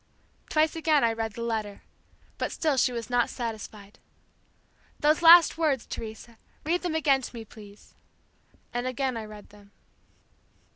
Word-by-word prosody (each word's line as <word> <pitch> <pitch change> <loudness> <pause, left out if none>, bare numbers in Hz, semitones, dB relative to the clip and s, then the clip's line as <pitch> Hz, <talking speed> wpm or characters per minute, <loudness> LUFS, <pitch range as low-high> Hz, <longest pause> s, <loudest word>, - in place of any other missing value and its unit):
Twice 310 +1 +2
again 310 -3 +2
I 230 -1 +2
read 225 -1 -4
the 235 - -6
letter, 215 -3 -4 0.6
but - - -2
still 310 -3 0
she 255 -1 +2
was 235 -2 -5
not 245 -1 +2
satisfied. 215 -4 -7 1.0
'Those 305 +3 +2
last 335 -1 +7
words, 290 -7 +1
Teresa, 225 +1 -9 0.3
Read 345 +3 0
them 350 -3 -3
again 280 -4 +2
to 245 - -8
me, 225 -1 -8
please.' 210 -1 -15 0.8
And 245 +1 -2
again 255 0 -2
I 225 -1 -5
read 210 -1 -12
them." 205 -1 -18
240 Hz, 150 wpm, -27 LUFS, 220-305 Hz, 1.0 s, last